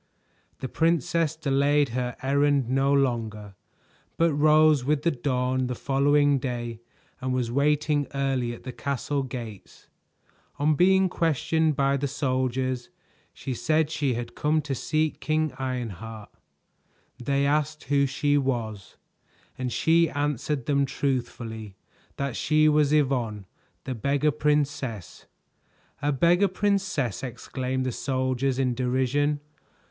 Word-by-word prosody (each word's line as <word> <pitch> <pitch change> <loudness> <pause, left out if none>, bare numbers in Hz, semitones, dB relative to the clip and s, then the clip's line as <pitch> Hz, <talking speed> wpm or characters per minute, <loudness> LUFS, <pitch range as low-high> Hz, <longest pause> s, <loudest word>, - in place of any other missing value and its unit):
The 130 - -2
princess 165 +1 +1
delayed 145 -1 +2
her 125 +1 -3
errand 140 -1 +2
no 135 +2 +2
longer, 115 -7 0 0.6
but 165 -1 +3
rose 155 -1 +5
with 145 +2 0
the 170 - +3
dawn 130 -1 -1
the 125 - -3
following 145 +2 +2
day 120 -3 -4 0.4
and 130 0 -2
was 120 -2 -1
waiting 145 +2 +1
early 135 -3 0
at 120 - -9
the 130 - -5
castle 140 +2 -2
gates. 120 -6 -8 0.7
On 150 +2 +2
being 190 +4 +4
questioned 160 -2 +1
by 140 0 +2
the 140 +1 -1
soldiers, 130 -2 -1 0.4
she 130 - -5
said 155 +4 +1
she 140 -5 0
had 120 0 -5
come 155 +1 +1
to 140 -1 -3
seek 155 +4 -1
King 155 -2 0
Ironheart. 115 -4 -5 0.9
They 140 +2 +1
asked 150 +1 0
who 140 0 +2
she 145 +2 +1
was, 110 -8 -3 0.6
and 130 -1 -3
she 165 +3 +3
answered 145 -1 -2
them 140 -1 +2
truthfully 115 -7 -3 0.4
that 140 -3 -2
she 155 +2 +3
was 150 -1 +3
Yvonne, 125 -9 +1 0.4
the 130 - -4
Beggar 140 +5 +1
Princess. 145 - -2 0.7
"A 145 - +1
Beggar 175 +7 +3
Princess!" 185 - -1
exclaimed 130 0 -3
the 130 - -1
soldiers 130 +1 -1
in 130 -2 +1
derision. 130 +4 0
140 Hz, 125 wpm, -26 LUFS, 125-150 Hz, 0.9 s, rose